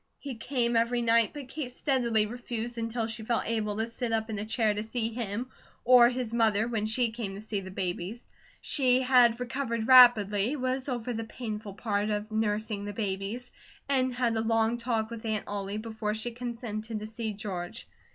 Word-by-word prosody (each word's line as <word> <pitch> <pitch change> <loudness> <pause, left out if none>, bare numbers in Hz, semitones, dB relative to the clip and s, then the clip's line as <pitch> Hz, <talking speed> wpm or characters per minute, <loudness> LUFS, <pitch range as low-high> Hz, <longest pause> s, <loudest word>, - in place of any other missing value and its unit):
He 280 -2 -6
came 235 0 -1
every 235 +1 +2
night, 230 -1 +4
but 290 -3 -8
Kate 265 -2 -5
steadily 240 -5 +1
refused, 240 +1 -5
until 230 0 -2
she 225 0 -4
felt 230 +1 0
able 215 -2 -1
to 220 - +1
sit 230 +1 -4
up 225 0 -1
in 210 - -3
a 210 - -3
chair, 220 -1 +1
to 205 - -2
see 225 +1 -2
him, 230 +2 -3 0.3
or 245 -1 +8
his 245 -2 -3
mother 220 -2 +3
when 220 -3 -1
she 230 +1 +1
came 220 -4 -4
to - - -7
see 215 -1 -3
the 190 - -8
babies. 190 +4 -4 0.3
She 260 -2 +3
had 250 -2 +5
recovered 235 -2 -2
rapidly, 235 -2 +7
was 260 0 -1
over 245 -1 -2
the 225 0 -3
painful 215 -3 -6
part 210 -1 -1
of 210 +1 -2
nursing 215 -1 -1
the 205 - -5
babies, 205 +4 -3 0.4
and 260 -2 +2
had 245 -2 0
a 220 - +1
long 225 +1 +1
talk 230 -2 -1
with 230 -1 -7
Aunt 220 -2 -1
Ollie, 200 0 -3
before 215 -1 -3
she 220 +2 -3
consented 230 -2 -5
to 210 - -5
see 220 0 -4
George. 190 -4 -5
225 Hz, 190 wpm, -29 LUFS, 215-245 Hz, 0.4 s, or